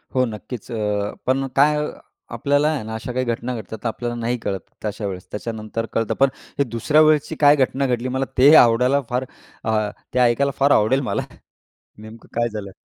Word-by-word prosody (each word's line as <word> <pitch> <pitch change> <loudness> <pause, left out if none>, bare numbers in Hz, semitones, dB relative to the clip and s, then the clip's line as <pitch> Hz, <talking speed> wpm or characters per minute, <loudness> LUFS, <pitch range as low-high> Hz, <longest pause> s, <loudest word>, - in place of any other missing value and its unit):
हो, 130 - +3
नक्कीच, 110 +1 -8
अ, 105 -2 -1
पण 135 +1 +1
काय, 150 +2 +4 0.6
आपल्याला 145 +1 +1
आहे 150 -8 -2
ना, 110 +1 -6
अशा 115 +3 -5
काही 130 +1 -1
घटना 120 +1 -2
घडतात 110 0 -7
तर - - 0
आपल्याला 120 +1 -3
नाही 120 +2 -1
कळत 95 -2 -2 0.3
तशा 105 0 -3
वेळेस. 90 -2 -7
त्याच्यानंतर 110 +1 -4
कळतं. 115 -1 0
पण 135 0 +5 0.3
हे - - +5
दुसऱ्या 125 +5 +2
वेळेसची 155 -1 +3
काय 145 0 +7
घटना 135 0 +1
घडली, 125 0 -1
मला 130 +1 -1
ते 140 +4 +7
आवडायला 125 +4 +5
फार 125 +1 -1 0.4
अ, 110 -1 0 0.2
ते 125 - +1
ऐकायला 125 +3 +3
फार 140 +1 +4
आवडेल 120 +6 +3
मला. - - 0 0.8
नेमकं 110 +2 -12
काय 120 - +2
झालं. 105 -3 -7
120 Hz, 185 wpm, -21 LUFS, 110-135 Hz, 0.8 s, काय